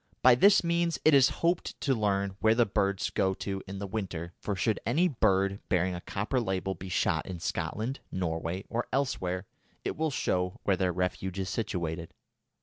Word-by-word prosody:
By 130 - +9
this 195 +13 +6
means 170 0 +1
it 155 - +7
is 135 0 +7 0.2
hoped 170 0 0
to 135 - +2
learn 100 -4 0
where 110 0 +4
the 120 0 +4
birds 100 -2 0
go 95 0 +1
to 95 0 -4
in 95 +1 -6
the 100 - -4
winter, 95 -5 -4
for 100 - -2
should 105 +4 0
any 155 +11 +3
bird 100 - +2
bearing 90 0 +2
a 85 - -5
copper 105 +8 -1
label 95 -2 -1
be 95 +1 -8
shot 85 -3 +1
in 90 -2 -5
Scotland, 115 +9 -3
Norway, 85 +1 -2
or 120 +1 -2
elsewhere, 95 -9 -1 0.4
it - - -1
will 160 0 0
show 90 -9 -1
where 100 - +3
their 90 0 +1
refuge 90 +1 -2
is 95 -1 -2
situated. 85 -5 -3
100 Hz, 185 wpm, -29 LUFS, 90-120 Hz, 0.4 s, By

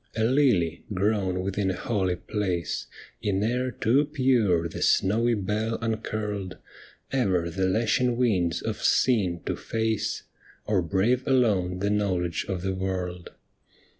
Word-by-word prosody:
A 110 - 0
lily 110 - +2
grown 95 -2 0
within 95 +1 -1
a 95 - -1
holy 95 -4 -1
place. 90 -3 -3 0.3
In 100 -1 0
air 125 +3 0
too 125 +5 +2
pure 125 - +2
the 80 - -7
snowy 115 +5 +3
bell 105 +3 -1
uncurled 105 -4 -3 0.5
Ever 95 -10 +1
the 95 +2 0
lashing 120 +4 +1
winds 95 -9 +1
of - - -3
sin 95 -9 +2
to - - -1
face, 110 -1 -2 0.4
Or 105 -3 +2
brave 100 +9 +1
alone 100 -9 +2
the 100 +1 +1
knowledge 95 -5 0
of 90 -2 -3
the 95 0 -1
world. 90 -2 -3
100 Hz, 135 wpm, -26 LUFS, 90-115 Hz, 0.5 s, snowy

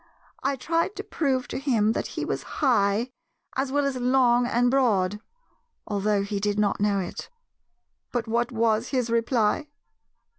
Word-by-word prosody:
I 275 +1 0
tried 330 +8 -1
to 405 - -5
prove 270 - -1
to - - -3
him 230 -6 +2
that - - -2
he - - -1
was - - -2
'high,' 230 -3 +1 0.4
as 265 0 -1
well 285 0 +1
as 275 -2 -1
long 245 -1 +3
and 245 +1 +2
broad, 210 -7 +2 0.7
although 205 -1 0
he 200 0 -3
did 205 0 -1
not 205 -1 +1
know 205 -1 +2
it. 180 - -6 0.8
But 240 -2 -2
what 235 +2 0
was 225 0 +1
his 250 -4 -1
reply? 230 +3 +1
240 Hz, 155 wpm, -25 LUFS, 210-265 Hz, 0.8 s, long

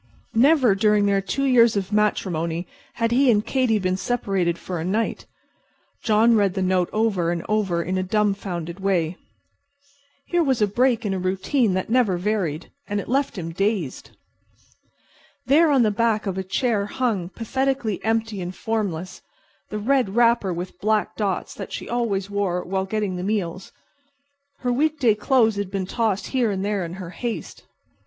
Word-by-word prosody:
Never 260 -1 +5
during 210 +1 +3
their 200 -1 +2
two 275 +8 -2
years 235 -5 +5
of 195 0 -3
matrimony 175 -5 0 0.3
had 230 0 0
he 260 +2 +4
and 210 -2 +3
Katy 255 -5 +1
been 185 -2 0
separated 190 -7 -1
for 180 -1 -5
a - - -3
night. 210 +6 -2 0.8
John 225 +1 +4
read 200 -3 +2
the 190 - 0
note 185 -1 +1
over 210 -6 +1
and 170 -1 -2
over 195 -6 0
in 185 +2 -1
a - - +1
dumbfounded 195 -3 -1
way. 185 -4 0 1.1
Here 350 -1 +1
was 265 -5 +1
a 210 - +4
break 240 +3 +1
in 200 - 0
a 190 - -2
routine 190 +4 +1
that 185 - -1
had - - -20
never 225 -8 +3
varied, 180 -5 -2 0.2
and 205 -1 -1
it - - -6
left 265 -2 0
him 165 -2 -4
dazed. 195 - -2 1.4
There 310 +5 +5
on 270 -4 +4
the 215 - +2
back 220 0 +1
of 195 -2 -2
a 190 - -2
chair 205 +2 0
hung, 210 -7 -1
pathetically 245 -1 -2
empty 225 -2 -1
and 180 +1 -5
formless, 185 -6 -3 0.5
the 210 - -4
red 230 -2 +1
wrapper 235 -5 +3
with 180 +1 -6
black 215 0 +1
dots 200 -4 -2
that - - -8
she - - -6
always 220 -5 -1
wore 200 -3 -1
while 190 +1 -2
getting 200 -2 -2
the 180 - -4
meals. 190 -3 -2 0.9
Her 245 -1 0
week 305 +4 +1
day 240 -6 +4
clothes 220 0 +2
had 200 -2 -2
been 195 -1 -2
tossed 215 -1 -1
here 250 -4 0
and 195 -1 -2
there 205 -2 -1
in 170 0 -6
her 180 -2 -7
haste. 235 +3 -6
205 Hz, 175 wpm, -23 LUFS, 185-230 Hz, 1.4 s, Never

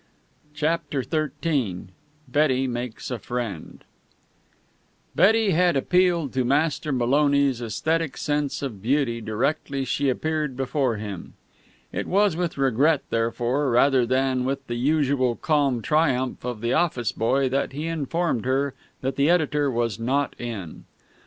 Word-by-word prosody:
CHAPTER 155 -3 -1
XIII 140 - -2 0.4
BETTY 135 -3 +2
MAKES 120 -1 -5
A 125 - -3
FRIEND 115 -8 -5 1.3
Betty 220 +1 +4
had 175 -2 +3
appealed 175 -1 +2
to 130 0 +1
Master 150 +3 +1
Maloney's 140 0 +2
esthetic 160 +7 -1
sense 145 -1 -1
of 115 -8 -5
beauty 120 -1 0
directly 135 +5 -1
she 140 +2 0
appeared 150 0 -2
before 135 -2 0
him. 100 -4 -7 0.6
It - - -3
was 200 -2 +3
with 175 -3 -2
regret, 135 +3 +2
therefore, 120 +4 0
rather 130 +1 +4
than 130 0 +1
with 135 +1 -2
the 120 - -4
usual 135 -1 +1
calm 140 -6 +1
triumph 135 -5 +1
of 120 -3 -4
the 120 +1 0
office 155 -9 +1
boy, 130 +4 +1
that 135 +2 -1
he 150 +3 -4
informed 165 -4 -1
her 135 +1 0 0.3
that 135 0 -2
the 140 +3 +3
editor 150 -4 +2
was 115 -3 -1
not 135 +4 0
in. 110 -9 -6
135 Hz, 135 wpm, -24 LUFS, 120-150 Hz, 1.3 s, Betty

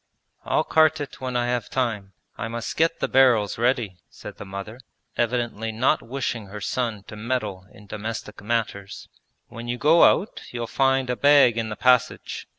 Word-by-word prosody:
'I'll - - +1
cart 160 0 +3
it 145 -2 -7
when 130 -1 -2
I 120 - +1
have 120 -2 -2
time. 110 -7 -2 0.2
I 115 - -4
must 115 0 -5
get 165 +1 +1
the - - +1
barrels 120 -6 +3
ready,' 120 -6 0
said - - -11
the - - -8
mother, 100 +4 -7 0.4
evidently 120 -2 -1
not 125 +7 +1
wishing 120 -4 -4
her 105 +2 -8
son 115 -2 -2
to 110 - -11
meddle 105 -5 -3
in 105 - -16
domestic 105 +1 -6
matters. 105 -3 -3 0.4
'When 115 +1 -8
you 120 +1 -2
go 160 +5 +5
out 205 - +2
you'll 120 -1 -4
find 135 +1 +1
a - - -1
bag 140 -3 +5
in 115 -1 -2
the 105 - -4
passage. 125 0 +1
120 Hz, 175 wpm, -24 LUFS, 105-130 Hz, 0.4 s, go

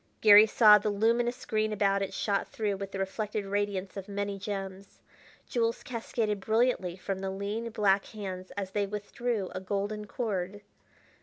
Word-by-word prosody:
Garry 210 0 +8
saw 210 -1 +7
the 210 - -1
luminous 235 +4 +1
green 215 0 0
about 200 -1 +1
it 195 - -2
shot 200 -2 -1
through 210 -2 -2
with 195 0 -6
the 195 - -5
reflected 205 +2 -3
radiance 200 -1 -2
of 195 0 -7
many 200 0 -3
gems. 195 -1 -6 0.5
Jewels 230 -2 -1
cascaded 225 -3 -2
brilliantly 220 -4 +1
from 190 0 -4
the 195 0 -3
lean 205 +4 -3
black 200 -3 +2
hands 190 -3 -7
as 195 -2 -3
they 205 0 0
withdrew 210 0 -3
a - - -4
golden 205 +2 -3
cord. 205 -4 -3
205 Hz, 160 wpm, -29 LUFS, 195-215 Hz, 0.5 s, Garry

